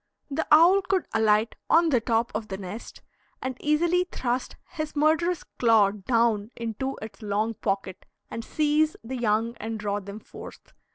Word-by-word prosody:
The 315 +4 -1
owl 340 +6 +7
could 375 -1 0
alight 220 0 +3 0.2
on 330 0 +5
the 250 -6 +2
top 230 +1 0
of 215 +1 -3
the 190 -2 -5
nest, 195 +4 -8 0.4
and 260 -1 -4
easily 340 +4 +2
thrust 250 0 -2
his 310 -1 -5
murderous 320 +4 +2 0.2
claw 220 -4 +5
down 215 0 +1
into 235 +4 -4
its 220 - -10
long 215 +2 -1
pocket 195 -2 -3 0.2
and 230 - -6
seize 305 +2 +1
the 255 +3 -5
young 230 0 0
and 225 0 -5
draw 205 -1 -1
them 200 +1 -9
forth. - - -12
230 Hz, 160 wpm, -26 LUFS, 210-300 Hz, 0.4 s, owl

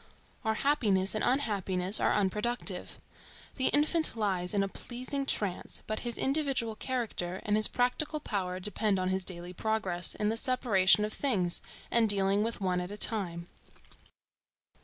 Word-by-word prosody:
Our 220 -1 0
happiness 215 -9 +2
and 215 - -1
unhappiness 200 -7 +1
are - - +2
unproductive. 210 +4 -1 0.6
The 260 - +4
infant 310 +2 +2
lies 190 -3 -1
in 200 - +3
a - - -1
pleasing 255 +6 -4
trance, 200 -8 -2
but 215 - -3
his 240 -2 -3
individual 270 -5 0
character 215 -8 -3
and 210 - +2
his 215 0 +5
practical 295 +5 0
power 185 -8 -3
depend 210 +1 0
on 185 0 -1
his 190 0 0
daily 175 -1 -4
progress 190 -4 -1
in 210 0 0
the 225 - 0
separation 210 -5 +3
of 215 - -4
things, 190 -11 0 0.3
and 230 -2 +3
dealing 200 0 +3
with 230 +2 -2
one 180 -2 0
at 180 - -5
a 205 - -7
time. 180 -7 +1
210 Hz, 155 wpm, -30 LUFS, 190-245 Hz, 0.6 s, his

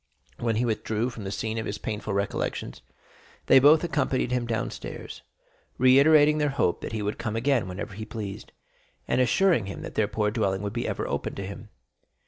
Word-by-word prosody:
0317m - - -8
When 115 -2 +1
he 120 +3 +1
withdrew 110 +1 -1
from 115 -3 -8
the 95 - -4
scene 110 +2 -3
of 110 - -4
his 100 - -3
painful 105 -1 -4
recollections, 100 -10 -3 0.6
they - - +7
both 150 +5 +6
accompanied 135 -6 0
him 125 -1 0
downstairs, 115 -1 -5 0.6
reiterating 145 +4 +6
their 150 -1 +2
hope 135 -10 0
that - - -5
he 110 -2 -3
would 105 +1 -3
come 110 -2 -3
again 120 -2 +1
whenever 95 +2 -6
he 110 +3 -6
pleased, 105 -4 -7 0.6
and 130 - +2
assuring 130 - +3
him 100 - -7
that - - -7
their 110 - +1
poor 105 0 0
dwelling 100 -3 -1
would 100 +2 -4
ever 120 - -2
be - - -3
open - - -3
to 100 - -5
him. 100 +2 -9
115 Hz, 195 wpm, -26 LUFS, 105-130 Hz, 0.6 s, they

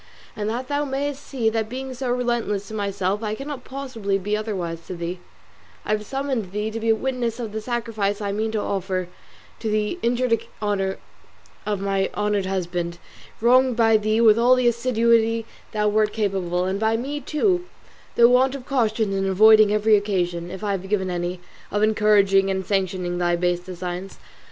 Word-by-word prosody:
And 210 0 -2
that 245 +3 -3
thou 290 0 0
mayest 285 0 -3
see 255 -6 -2
that 220 -1 -1
being 260 +2 -5
so 255 0 -4
relentless 240 -5 -1
to - - -8
myself 200 -1 -1
I 215 -1 -2
cannot 275 0 -6
possibly 240 -8 -3
be 205 +2 -1
otherwise 190 -6 -3
to 185 - -5
thee, 170 +1 -4 0.7
I - - -2
have 210 -1 -1
summoned 265 -8 -2
thee 210 +1 -2
to 225 - -4
be 225 0 -1
a 225 - +5
witness 250 -1 -2
of 225 -3 -4
the 220 +1 -4
sacrifice 220 -4 -2
I 200 -2 -2
mean 220 +2 -1
to 220 - 0
offer 190 -3 -2 0.5
to 225 - -2
the 215 +10 -1
injured 240 -1 +1 0.2
honour 200 -2 -1 0.7
of 205 -2 -1
my 195 -1 0
honoured 210 -2 0
husband, 175 -2 -2 0.4
wronged 255 +1 +4
by 225 -1 +4
thee 215 +1 +2
with 225 -1 +6
all 245 +2 +6
the 255 -1 +2
assiduity 230 -1 +2 0.3
thou 210 -1 0
wert 210 0 +2
capable 190 -4 -1
of, 185 - -1
and 195 +1 -2
by 220 +1 +2
me 280 +5 -3
too 355 +5 0 0.5
through 235 0 +7
want 260 +2 +4
of 260 -3 -8
caution 220 -6 0
in 195 0 0
avoiding 215 +2 +6
every 210 +1 +4
occasion, 175 -4 -1
if 190 +3 -8
I 205 - 0
have 190 -1 -3
given 190 -3 0
any, 175 0 -3 0.3
of 205 +1 0
encouraging 205 -3 +4
and 190 -1 -1
sanctioning 185 -2 -1
thy 175 -1 +2
base 175 0 0
designs. 180 +1 -6
215 Hz, 185 wpm, -23 LUFS, 195-235 Hz, 0.7 s, through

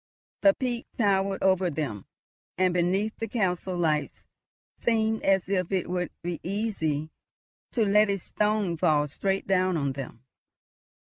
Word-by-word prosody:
The 295 - +6
peak 245 -3 -3
towered 195 -3 +1
over 190 -1 +3
them, 140 - -4 0.5
and 185 -1 +3
beneath, 190 +5 +1
the 225 - -2
castle 185 -4 -1
lights 155 -3 -1 0.5
seemed 220 -1 +1
as 195 -2 +2
if 185 -2 -1
it 185 -2 -1
would 180 -1 -1
be 175 -1 -3
easy 165 -7 -2 0.6
to 230 -3 +2
let 210 +1 +4
a 200 - +1
stone 210 -2 0
fall 155 -3 +3
straight 195 +6 -1
down 185 -2 +2
on 140 -3 -1
them. 130 -3 -8
185 Hz, 140 wpm, -27 LUFS, 170-210 Hz, 0.6 s, The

